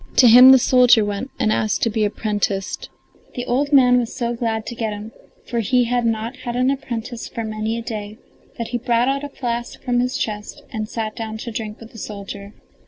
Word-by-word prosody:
To 255 - +7
him 250 +3 +10
the 265 - +9
soldier 245 -3 +5
went 205 +6 -4
and 215 - +2
asked 215 -1 0
to 230 - +3
be 215 0 0
apprenticed. 205 -2 -2 0.5
The 245 - -4
old 280 +4 0
man 250 -3 +6
was 235 -2 -4
so 240 -1 -1
glad 225 -2 -2
to - - -5
get 225 -2 -3
him, 210 +2 -8 0.3
for 235 - -2
he 245 +3 +2
had 240 0 0
not 225 +3 -2
had 240 0 -5
an 255 +2 +2
apprentice 240 -3 -5
for 230 - -5
many 215 +1 -3
a 230 - -5
day, 215 -2 -6 0.4
that 230 - -4
he 240 0 -2
brought 240 0 +1
out 275 +1 -1
a 290 - -5
flask 240 -3 -4
from 245 -1 +1
his 250 +1 0
chest 210 -1 -5
and 215 -1 -3
sat 220 -2 -4
down 220 -1 -5
to 235 +2 -6
drink 215 -1 -5
with 225 0 -12
the 225 - -11
soldier. 200 0 -8
230 Hz, 220 wpm, -21 LUFS, 215-245 Hz, 0.5 s, him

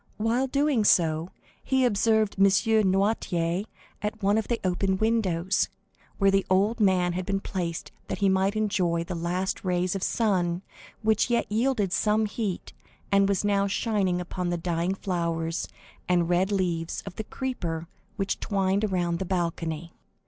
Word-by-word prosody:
While 230 +5 +1
doing 280 -3 +2
so, 165 -3 +3 0.3
he 265 -1 +2
observed 220 -2 +2
M. 195 - +7
Noirtier 195 -3 +2 0.4
at 210 0 -4
one 200 +1 +3
of 220 - -4
the 235 - -1
open 190 +1 +1
windows, 195 -4 +1 0.5
where 195 -1 +4
the 195 0 +3
old 200 +5 +2
man 185 -4 +3
had 185 +1 -2
been 195 +1 -1
placed 175 -4 -4 0.2
that - - -3
he 200 +1 +2
might 190 +2 +2
enjoy 185 -6 +1
the 175 - -5
last 175 +3 -2
rays 180 -1 0
of 195 - -3
the - - +1
sun 185 -5 0 0.4
which 220 +2 +2
yet 235 -1 +2
yielded 220 -4 +1
some 215 0 +2
heat, 205 -3 -4 0.4
and 200 0 +4
was 200 +1 +1
now 200 -1 +2
shining 195 -3 0
upon 180 0 -3
the 175 - 0
dying 170 +2 -1
flowers 170 -3 -2 0.4
and 175 -2 +2
red 180 +3 +2
leaves 175 -4 -1
of 195 -2 -8
the 220 - -3
creeper 175 -11 -4 0.3
which 195 -2 -2
twined 195 0 0
around 175 -4 0
the - - -1
balcony. 170 -2 -2
195 Hz, 160 wpm, -27 LUFS, 175-210 Hz, 0.5 s, M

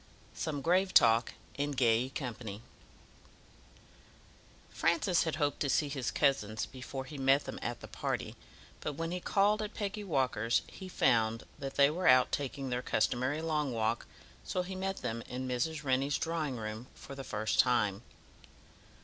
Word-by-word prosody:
Some 145 -3 -3
Grave 185 +3 +2
Talk 115 -1 +5 0.2
In 145 0 0
Gay 125 -1 +3
Company 115 -6 -6 2.1
Francis 170 +1 +2
had 160 - -1
hoped 145 -3 0
to 140 - 0
see 145 +2 +2
his 135 -4 -2
cousins 110 -7 +1
before 130 0 -7
he 145 +1 -8
met 135 +2 +4
them - - -6
at - - -4
the - - -8
party, - - -3 0.4
but 150 - -3
when 165 +3 -3
he 180 - -2
called 205 +4 +2
at 215 +1 -5
Peggy 210 0 -3
Walker's 130 - +1
he 190 -1 -10
found 115 -7 +2 0.2
that 135 -1 -5
they 140 0 +6
were 180 +3 -1
out 130 0 +6
taking 135 -1 -3
their 125 0 0
customary 130 +5 0
long 150 -4 0
walk, 110 0 -1 0.4
so 180 - -1
he 185 +1 -6
met 190 +1 -2
them 115 +1 -2
in 130 +1 -4
Mrs. 150 +5 -1
Rennie's 135 +1 +1
drawing 160 -5 -2
room 110 +2 -5
for - - -10
the 135 0 -6
first 110 -2 -2
time. 105 -5 +3
135 Hz, 160 wpm, -32 LUFS, 120-160 Hz, 2.1 s, they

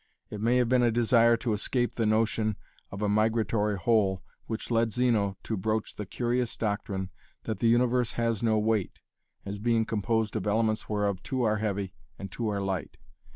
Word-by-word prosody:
It 105 - -5
may 120 +3 +3
have 125 -1 +3
been 125 +1 +3
a 120 - +4
desire 115 0 +4
to 115 -1 -1
escape 120 +4 -1
the 115 -2 0
notion 110 -1 +1 0.3
of 100 +2 -5
a - - +2
migratory 110 0 +1
whole 95 -1 +1 0.2
which 110 +1 -4
led 115 -1 +2
Zeno 110 -5 +1
to 110 - -2
broach 110 +2 -2
the 105 - -7
curious 120 +2 -1
doctrine 100 -3 -2 0.3
that 110 -3 -4
the 115 - +2
universe 120 0 +2
has 115 -3 -1
no 110 -2 +2
weight, 105 -2 0 0.5
as 100 0 -5
being 115 0 +2
composed 110 +1 -1
of 110 -1 -2
elements 110 +1 0
whereof 105 -3 0
two 130 -3 -2
are 110 -2 +2
heavy 100 -3 -2 0.2
and 100 -1 -7
two 115 +2 -3
are 100 -1 -2
light. 95 -5 -3
110 Hz, 185 wpm, -28 LUFS, 105-115 Hz, 0.5 s, a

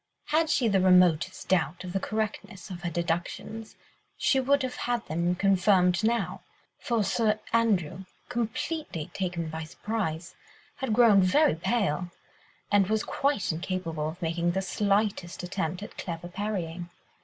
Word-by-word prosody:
Had 315 +1 +2
she 260 - +2
had 220 - +3
the 195 - +5
remotest 180 -1 +4
doubt 175 -2 +1
of 180 -1 -6
the 195 - +1
correctness 210 -2 -4
of 175 -1 -7
her 175 - -2
deductions, 175 +6 -3 0.4
she 270 - +3
would 280 +1 +2
have 255 -1 -3
had 240 -2 0
them 170 +3 0
confirmed 190 -1 +3
now, 230 +1 0 0.4
for 235 -3 0
Sir 215 +2 +1
Andrew, 190 -6 +1 0.2
completely 240 - -3
taken 175 -3 -2
by 160 +1 -5
surprise, 170 -1 -4 0.4
had 265 -4 -2
grown 220 -4 +6
very 190 - +4
pale, 180 -1 0 0.6
and 200 -2 +4
was 220 +1 +1
quite 280 -10 0
incapable 165 -2 -3
of 160 - -9
making 170 +1 0
the 190 +1 -1
slightest 200 -2 0
attempt 180 0 -3
at - - -10
clever 175 0 -5
parrying. 175 -3 -4
190 Hz, 145 wpm, -28 LUFS, 175-220 Hz, 0.6 s, grown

